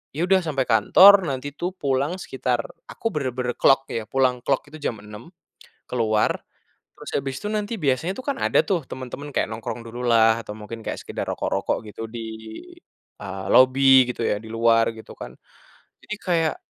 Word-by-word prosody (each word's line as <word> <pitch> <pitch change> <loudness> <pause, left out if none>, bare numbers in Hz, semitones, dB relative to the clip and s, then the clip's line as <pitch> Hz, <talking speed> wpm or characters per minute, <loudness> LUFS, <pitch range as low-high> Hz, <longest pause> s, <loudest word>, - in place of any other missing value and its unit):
ya 165 +4 0
udah 190 +1 +4
sampai 140 -4 0
kantor 185 - +7
nanti 135 +1 -4
tuh 175 +5 -3
pulang 140 0 -1
sekitar 125 -2 -1 0.3
aku 225 - -3
benar-benar 130 -4 -2
clock 135 0 +4
ya, 115 -2 -3
pulang 130 -1 +1
clock 135 -2 +1
itu - - -7
jam 115 - -2
6.00, 105 +6 -11 0.6
keluar. 110 -3 +1 0.6
Terus - - -9
habis 135 -1 -4
itu 205 - -3
nanti 215 +1 -2
biasanya 145 +3 0
tuh 260 - -7
kan 280 -2 -1
ada - - +3
tuh 185 -5 0
temen-temen 130 +3 -7
kayak - - 0
nongkrong 110 +1 -5
dululah, 115 -1 +2
atau - - -6
mungkin 110 +2 -8
kayak - - -4
sekedar - - -5
rokok-rokok - - -1
gitu 110 - -9
di, 115 0 -6 1.0
eee, 95 -1 -6
lobi 130 0 +6
gitu 120 - -5
ya, - - +1
di - - -12
luar 115 0 +3
gitu 110 - -13
kan. - - -8 0.7
Jadi 210 - -5
kayak, 165 -5 +1
130 Hz, 175 wpm, -23 LUFS, 115-150 Hz, 1.0 s, kantor